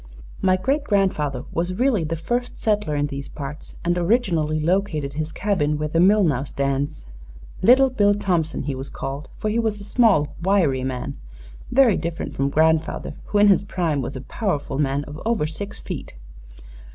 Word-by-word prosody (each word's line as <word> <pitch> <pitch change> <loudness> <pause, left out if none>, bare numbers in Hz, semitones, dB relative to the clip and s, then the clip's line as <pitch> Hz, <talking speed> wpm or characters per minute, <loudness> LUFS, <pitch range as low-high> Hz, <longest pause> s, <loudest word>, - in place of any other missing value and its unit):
My 185 0 +3
great 275 +10 0
grandfather 155 - 0
was 175 +2 -1
really 245 -7 +2
the 160 +1 -2
first 240 +10 -3
settler 210 -8 0
in 145 0 +1
these 140 -1 -5
parts 150 +1 -8
and 175 0 +2
originally 170 -6 +1
located 160 -4 0
his 155 +1 -3
cabin 160 -8 0
where 150 0 -2
the 165 - +1
mill 200 +4 +5
now 140 -7 +1
stands. 140 - -2 0.6
'Little 260 +6 +6
Bill 205 -4 +3
Thompson,' 175 -8 0
he 140 0 -2
was 135 +1 -6
called, 140 +4 -6
for 215 - -1
he 230 - +1
was 220 -2 -1
a - - -9
small, 200 - +3
wiry 170 -9 +2
man 130 -1 -4 0.5
very 250 -6 +5
different 165 0 -4
from 135 +1 0
grandfather, 160 +2 +1
who 210 - -1
in 205 0 +6
his 195 - +5
prime 170 -7 -1
was 125 - -5
a 130 - -5
powerful 145 - -2
man 140 0 0
of 145 +1 -9
over 225 -8 +1
six 195 +6 -6
feet. - - -7
165 Hz, 175 wpm, -23 LUFS, 145-205 Hz, 0.6 s, Little